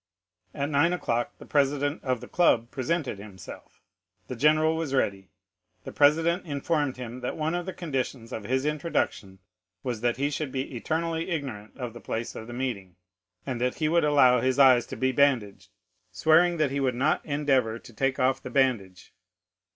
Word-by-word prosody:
At 140 +2 -2
nine 155 +5 +3
o'clock 120 -9 -2
the - - -12
president 145 +1 0
of 130 -3 -1
the - - -9
club 120 -9 +2
presented 135 - -2
himself; 100 -2 -12 0.5
the 130 - -4
general 155 +5 +3
was 160 -4 -2
ready, 100 -7 -1 0.5
the - - -7
president 165 +5 +3
informed 145 -2 -1
him 125 0 -7
that 125 - -4
one 155 +1 -1
of 175 0 -3
the - - -2
conditions 130 -6 -4
of 110 - -5
his 130 +4 0
introduction 150 - -2 0.5
was 120 -4 -3
that 120 -1 0
he 140 +2 0
should 145 -1 -3
be 135 0 -4
eternally 165 +6 -2
ignorant 130 - -5
of 125 -4 -5
the 120 - -11
place 115 +1 -4
of 110 - -9
meeting, 120 -8 -4 0.5
and 125 -3 -4
that 125 0 0
he 155 - 0
would 170 +2 +3
allow 130 -5 +5
his 130 +1 +1
eyes 130 -3 +6
to - - -6
be 130 +2 +1
bandaged, 115 -10 +1 0.4
swearing 160 - +4
that 155 -4 +1
he 140 - -1
would 130 -3 0
not 140 +5 +1
endeavor 135 -6 +1
to 120 - -15
take 135 +3 0
off 130 +1 +1
the - - -7
bandage. 120 -9 0
135 Hz, 180 wpm, -27 LUFS, 120-150 Hz, 0.5 s, eyes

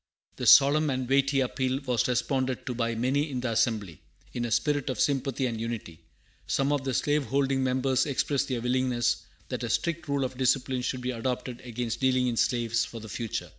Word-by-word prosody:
This - - +3
solemn 145 +2 +6
and 130 -2 -2
weighty 135 +1 +3
appeal 130 +1 -1
was 125 -4 +1
responded 130 +1 -1
to 125 - -3
by 115 -1 -1
many 135 +6 0
in 130 -3 -3
the 125 -2 -1
assembly, 110 -7 0 0.3
in 120 -1 -2
a - - -3
spirit 145 +3 +1
of 130 - -3
sympathy 135 -2 0
and 115 -3 -3
unity. 115 -8 -5 0.5
Some 135 +1 +1
of 145 -2 0
the 135 -2 -2
slave 145 -1 +1
holding 135 +2 +1
members 130 +1 +1
expressed 140 0 0
their 125 -3 -2
willingness 125 -1 +1 0.3
that - - -3
a - - -2
strict 170 -1 -1
rule 140 -1 0
of 130 0 -4
discipline 130 0 +1
should 125 0 -3
be 125 +1 -2
adopted 125 +1 -3
against 120 -1 -4
dealing 130 -1 +2
in 120 -2 0
slaves 115 -1 +1
for 115 +1 -7
the 110 0 -10
future. 115 +2 -4
130 Hz, 200 wpm, -28 LUFS, 120-135 Hz, 0.5 s, solemn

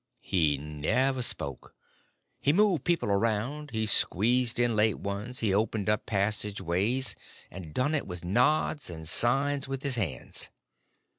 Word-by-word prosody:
He 80 -6 +1
never 75 - -1
spoke; 70 - -2 0.6
he 140 - +2
moved 190 -5 +2
people 175 -11 0
around, 115 +8 -1
he 110 -3 -2
squeezed 120 +4 +3
in 120 -2 +1
late 105 0 +2
ones, 105 +5 -5
he 105 -4 +1
opened 105 0 -1
up 105 - -2
passageways, 105 +3 0 0.4
and 85 -3 -9
done 130 - 0
it 150 - -1
with 90 -2 -7
nods, 125 - +2
and 80 -2 -8
signs 135 - +3
with 135 0 -5
his 135 -3 +1
hands. 85 - -3
110 Hz, 140 wpm, -28 LUFS, 95-130 Hz, 0.6 s, squeezed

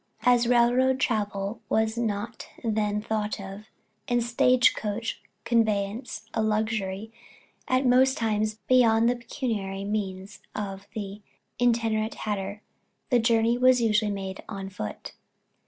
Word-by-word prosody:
As 245 0 +4
railroad 250 +2 +4
travel 210 -2 -1
was 220 0 +1
not 225 0 -3 0.2
then 210 -2 0
thought 215 -1 -2
of, 195 +2 -8 0.4
and 240 -1 +2
stage 250 +1 +4
coach 220 +2 -4 0.2
conveyance 220 0 0
a 220 - 0
luxury 215 -1 -1 0.5
at 255 +1 +2
most 260 +2 +4
times 215 -1 0
beyond 230 -3 +5
the 245 - +2
pecuniary 220 -6 -3
means 200 -1 -4 0.2
of 195 -1 -5
the 205 -1 -5 0.4
itinerant 225 -2 +1
hatter, 205 -1 -4 0.5
the 245 - +5
journey 230 +1 +2
was 255 0 +5
usually 215 -2 +2
made 195 -1 -4
on 195 -2 -5
foot. 105 - -6
220 Hz, 120 wpm, -27 LUFS, 205-235 Hz, 0.5 s, beyond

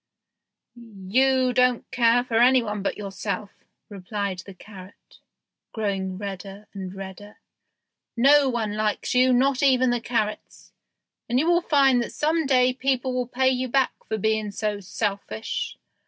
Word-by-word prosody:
"You 245 +4 0
don't 250 -1 +1
care 240 0 +3
for 230 -2 0
any 250 +1 +5
one 210 -2 -4
but 195 - -2
yourself," 200 +1 -5 0.4
replied 200 -1 -4
the 190 +1 -10
carrot, 190 0 -15 0.5
growing 195 -4 -2
redder 200 0 -7
and 190 -2 -6
redder; 195 +2 -10 0.8
"no 280 +3 +5
one 220 -4 -2
likes 215 -1 -1
you, 255 +1 +4
not 260 +1 +2
even 255 -2 +3
carrots, 220 -3 -4 0.6
and 240 - +1
you 285 - +2
will 345 0 +3
find 270 -6 +3
that - - -5
some 315 0 0
day 255 -2 +3
people 260 0 -1
will 250 -1 -1
pay 260 +1 +1
you 255 0 -1
back 265 +1 +1 0.2
for 220 - -1
being 220 0 0
so 210 0 -3
selfish. 200 - -4
230 Hz, 140 wpm, -24 LUFS, 200-255 Hz, 0.8 s, any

